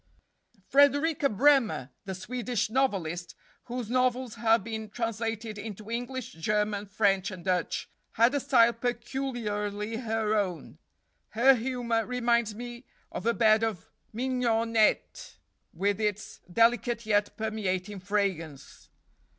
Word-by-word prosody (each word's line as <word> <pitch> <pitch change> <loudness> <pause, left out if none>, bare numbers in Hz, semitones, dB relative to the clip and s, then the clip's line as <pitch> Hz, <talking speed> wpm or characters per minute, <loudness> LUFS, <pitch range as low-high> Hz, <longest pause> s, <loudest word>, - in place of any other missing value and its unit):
Frederika 285 +1 +4
Bremer, 235 - +3
the 190 -1 -4
Swedish 230 +2 -2
novelist, 185 -10 -1 0.3
whose 245 -2 -4
novels 255 0 +1
have 225 -2 +2
been 220 0 -5
translated 225 -1 -3
into 215 +1 -8
English, 245 +2 -4
German, 210 +4 -1
French, 195 -1 +1
and 185 -3 -9
Dutch, 180 -2 -1 0.3
had 235 +4 +4
a 285 - +1
style 235 -3 +4
peculiarly 230 -4 -3
her 225 -2 -1
own. 195 -5 -2 0.6
Her 265 +4 +7
humor 240 -2 -1
reminds 235 -2 +1
me 240 +2 -8 0.3
of - - -4
a 235 - +4
bed 220 -1 +4
of 220 -7 -3 0.2
mignonette, 230 -2 0 0.3
with 200 +4 -1
its 210 -1 -2
delicate 230 +2 +2
yet 205 -1 +1
permeating 205 -3 -2
fragrance. 185 -7 -3
225 Hz, 115 wpm, -28 LUFS, 205-245 Hz, 0.6 s, Her